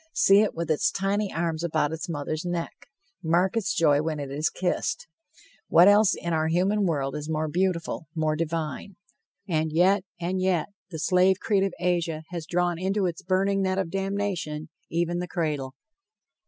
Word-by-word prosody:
See 195 +1 +6
it 215 -1 +1
with 165 -1 -2
its 155 - +2
tiny 195 +1 -1
arms 165 -1 -2
about 155 -3 0
its 160 +2 -5
mother's 155 0 -3
neck. 175 -1 -4 0.4
Mark 175 +4 +2
its 225 -4 0
joy 145 -3 +4
when 155 -1 -2
it 140 -1 -5
is 150 +3 0
kissed. 185 - -2 0.6
What 175 +3 +6
else 205 0 +5
in 170 0 -3
our 160 0 +1
human 190 +5 +2
world 140 -5 -1
is 150 +1 -5
more 155 0 -1
beautiful, 170 -1 -1
more 155 -1 +1
divine? 165 +3 -3 0.5
And 160 -3 0
yet, 185 +4 +3 0.2
and 180 +2 -2
yet, 185 -3 +1 0.2
the 165 - -6
slave 185 +3 +3
creed 200 -3 +1
of 195 -2 -1
Asia 170 -3 0
has 170 -3 -5
drawn 175 -1 0
into 195 +2 0
its 170 -2 -3
burning 195 +2 +1
net 190 0 0
of 190 -4 -2
damnation 195 -6 -3 0.2
even 175 +1 -1
the 180 - -3
cradle. 150 -7 -2
170 Hz, 175 wpm, -26 LUFS, 155-190 Hz, 0.6 s, See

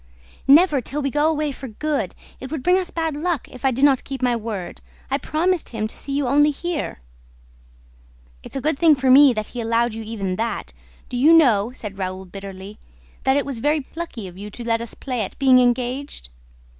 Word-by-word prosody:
"Never, 295 0 +6
till 290 +4 -4
we 275 - -1
go 295 +3 +2
away 305 -2 -1
for 265 0 -8
good! 255 - -2 0.2
It 260 - -7
would 310 -4 -4
bring 360 +1 +4
us 365 - -3
bad 325 -3 -2
luck, 325 -2 -2
if 255 - -12
I 270 - +4
did 265 +3 +2
not 275 -3 +3
keep 270 -1 -6
my 245 -1 +2
word. 210 -6 -5 0.3
I 275 - +1
promised 345 +4 0
him 220 -2 -3
to 215 - -6
see 280 - -5
you 280 0 0
only 290 +3 +4
here." 310 - -4 1.4
"It's - - -11
a 270 - -2
good 300 0 0
thing 325 -3 +6
for 265 -1 +2
me 280 +1 +8
that 215 -2 -4
he 245 - -3
allowed 230 +1 +1
you 225 - -6
even 200 -4 -4
that. 230 +1 -3 0.3
Do 250 - -4
you 300 +7 +6
know," 240 -9 +4
said 200 -5 -7
Raoul 185 0 -4
bitterly, 195 +2 -9 0.5
"that 265 +1 +3
it 285 - 0
was 275 -5 -5
very 295 +4 +1
plucky 275 - -7
of 180 +1 -12
you 205 +1 -7
to 240 +4 -9
let 230 -1 0
us 235 - -5
play 250 -4 -3
at 195 - -5
being 260 -2 +5
engaged?" 245 - -1
260 Hz, 215 wpm, -22 LUFS, 225-295 Hz, 1.4 s, me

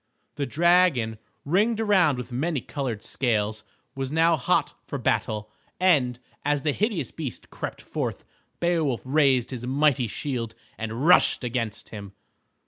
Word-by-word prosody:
The 140 -1 -3
dragon, 165 -10 +3 0.3
ringed 210 +9 +2
around 190 - +3
with 125 +1 -6
many 145 +5 -1
colored 125 -5 -4
scales, 110 -4 0 0.3
was 135 0 -4
now 165 +1 +4
hot 135 - +1
for - - -5
battle, 105 0 -1 0.3
and, 140 -10 +3 0.3
as 145 -1 0
the 155 - +2
hideous 190 - -1
beast 145 -7 -7
crept - - -6
forth, - - -4 0.3
Beowulf 165 -8 0
raised 135 -3 +3
his 125 -1 -5
mighty 135 -2 +2
shield 115 -2 -4 0.2
and 115 +5 -4
rushed 180 -5 +5
against 115 -3 -3
him. 100 -2 -9
135 Hz, 135 wpm, -25 LUFS, 120-160 Hz, 0.3 s, rushed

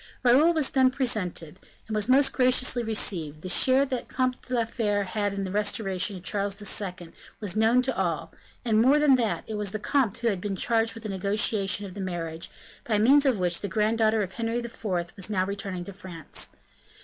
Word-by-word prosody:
Raoul 265 +7 +5
was 315 -5 0
then 260 -1 +4
presented, 200 - -2 0.3
and 220 - -5
was 215 +2 0
most 270 +2 +4
graciously 255 -1 +2
received; 170 -9 -2
the 185 - -4
share 260 +8 +5
that 260 -3 -4
the - - -10
Comte 255 -1 0
de 255 - -4
la 230 -1 +1
Fere 210 -3 -1
had 190 - -8
had 205 -2 -1
in 195 - -3
the 190 - -4
restoration 200 -1 -1
of 180 - -10
Charles 200 +1 0
II. 180 -4 -5 0.3
was 205 -5 -4
known 225 +3 +3
to 265 -1 -1
all; 170 -5 -2 0.3
and, 220 -2 +3
more 265 +5 +5
than 295 -2 +4
that, 230 -4 -1
it 220 - -6
was 210 -1 -2
the - - -1
comte 230 0 0
who 235 0 0
had 195 -4 -2
been 200 -1 -3
charged 225 +2 +1
with 225 - -10
the 215 - -5
negotiation 200 0 +1
of 190 - -9
the 200 - -6
marriage, 165 -3 -4 0.3
by 215 -3 0
means 275 +7 +5
of 255 -5 +2
which 180 -2 0
the 200 - -3
granddaughter 220 +1 +1
of 190 -1 -7
Henry 230 0 -2
IV. 235 -1 -7 0.3
was 195 0 -2
now 185 -3 +1
returning 195 -2 -5
to 200 - -9
France. 180 -5 -7
210 Hz, 215 wpm, -26 LUFS, 190-240 Hz, 0.3 s, Raoul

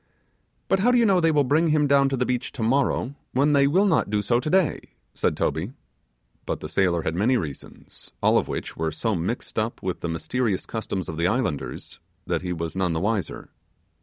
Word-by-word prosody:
'But 195 - +2
how 225 +6 +3
do 250 - +4
you 235 - +4
know 195 -4 +4
they 165 -1 +3
will 150 -2 +3
bring 150 +6 +2
him 150 -1 +3
down 140 -1 +4
to 135 - -1
the 125 - +1
beach 125 0 -2
tomorrow, 130 +1 0 0.2
when 140 +3 +3
they 140 -1 +5
will 185 +8 +3
not 175 - +2
do 105 0 0
so 120 +3 +2
today?' 160 +6 0 0.2
said - - 0
Toby. 85 - -1 0.7
But - - -2
the - - -6
sailor 85 -4 +1
had 80 - -1
many 110 +9 +2
reasons, 75 - -8
all - - +4
of - - -4
which - - -5
were 80 0 -2
so 110 +8 -1
mixed 95 +7 -3
up 110 +2 -3
with 95 -1 -2
the 85 - -4
mysterious 95 +6 -1
customs 100 -5 -4
of 80 - -5
the 85 +1 +2
islanders, 95 - -3 0.3
that - - -1
he 90 -1 -4
was 85 -1 -4
none 95 -3 0
the 80 - -1
wiser. 100 -2 -2
115 Hz, 210 wpm, -24 LUFS, 90-140 Hz, 0.7 s, they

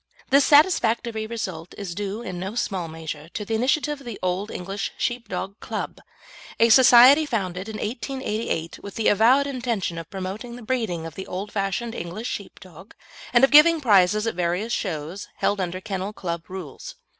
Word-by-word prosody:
This 275 0 +6
satisfactory 235 -8 +3
result 185 -7 -5
is 195 -4 -5
due 205 +4 -4
in 185 -6 -5
no 190 +4 -5
small 190 -7 -2
measure 160 -1 -7
to 210 - -3
the 225 - -3
initiative 275 +5 +1
of - - -15
the 230 - -5
Old 185 +3 -1
English 195 +1 -4
Sheepdog 205 -5 -3
Club, - - -5 0.6
a 230 - +5
society 255 +4 +8
founded 195 - -3
in 215 - -5
1888, 225 - -3
with 200 - -9
the 225 - +2
avowed 240 +7 +4
intention 240 -10 -2
of 165 - -9
promoting 200 +5 -6
the 245 - -10
breeding 220 -9 -2
of 165 - -7
the 190 - -7
old 195 +3 -5
fashioned 200 +3 -2
English 200 +5 -5
Sheepdog, 190 -1 -9 0.4
and 240 +1 +4
of 270 - +6
giving 320 +3 +7
prizes 210 -4 +4
at 225 - -1
various 180 +6 -1
shows 170 0 -4
held 200 -1 0
under 180 0 -3
Kennel 195 0 -4
Club 170 -4 -5
Rules. 180 -7 -8
205 Hz, 170 wpm, -24 LUFS, 185-235 Hz, 0.6 s, society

